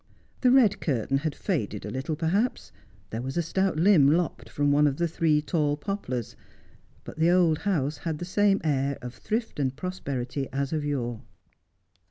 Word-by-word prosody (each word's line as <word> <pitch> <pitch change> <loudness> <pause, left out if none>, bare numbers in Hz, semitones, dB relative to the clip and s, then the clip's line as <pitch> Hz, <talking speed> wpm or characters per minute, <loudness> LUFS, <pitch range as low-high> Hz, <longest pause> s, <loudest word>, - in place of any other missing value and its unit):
The 255 - +4
red 230 -6 +5
curtain 135 -1 0
had 155 0 -3
faded 110 - -2
a 105 - -5
little, 135 +4 -3
perhaps; 185 +10 -1 0.4
there 115 - -3
was 135 +5 -4
a 170 - +2
stout 190 +1 0
limb 170 -4 +5
lopped 165 +2 0
from 145 0 +1
one 150 +1 +4
of 140 -1 -1
the 170 - +1
three 155 -2 +1
tall 150 -3 0
poplars; 145 - -4 0.7
but - - -10
the 165 +2 +4
old 175 -3 +4
house 155 -7 -1
had 160 -3 -3
the 175 - -5
same 200 +2 +2
air 140 -2 0
of 125 -1 -6
thrift 225 - -3
and 135 -2 0
prosperity 140 -6 -4
as 140 +2 -2
of 155 -2 -1
yore. 120 -6 -2
150 Hz, 180 wpm, -27 LUFS, 135-180 Hz, 0.7 s, red